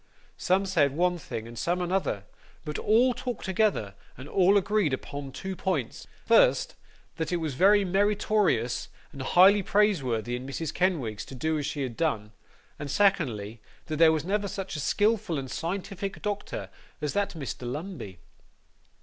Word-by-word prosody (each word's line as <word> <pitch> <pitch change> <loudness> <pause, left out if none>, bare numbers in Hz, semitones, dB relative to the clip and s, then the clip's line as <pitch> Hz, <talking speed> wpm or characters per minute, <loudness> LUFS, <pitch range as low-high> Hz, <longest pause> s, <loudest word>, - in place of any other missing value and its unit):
Some 190 +1 +2
said 150 -7 +2
one 180 0 +2
thing, 115 -6 -6
and 120 - -10
some 175 +7 0
another; 180 - -1 0.4
but 150 -1 -4
all 245 +4 +4
talked 250 -1 -5
together, 190 - +1 0.2
and 130 +3 -9
all 195 +4 +4
agreed 200 -6 +1
upon 140 +1 -5
two 190 +7 -5
points: 160 -11 -3 0.2
first, - - +4 0.4
that 160 +1 -2
it - - +1
was 160 -4 -2
very 200 +8 +5
meritorious 195 - +1 0.2
and 140 - -8
highly 190 +9 +6
praiseworthy 135 - +1
in 125 +2 -6
Mrs. 145 +2 -4
Kenwigs 130 - 0
to 135 - -10
do 155 +4 -1
as 145 - -2
she 145 - -3
had 125 -3 -4
done: 110 -10 -1 0.5
and 145 - -5
secondly, 130 - +1 0.2
that 155 -2 -3
there 165 0 +7
never 170 +7 0
was 200 -2 -4
such 195 -2 -5
a - - -3
skilful 205 +2 +1
and 130 -2 -5
scientific 195 +2 -4
doctor 205 -1 -4 0.3
as 150 -1 -2
that 200 -2 -1
Dr 130 -4 -5
Lumbey. 145 - -6
170 Hz, 160 wpm, -27 LUFS, 135-195 Hz, 0.5 s, there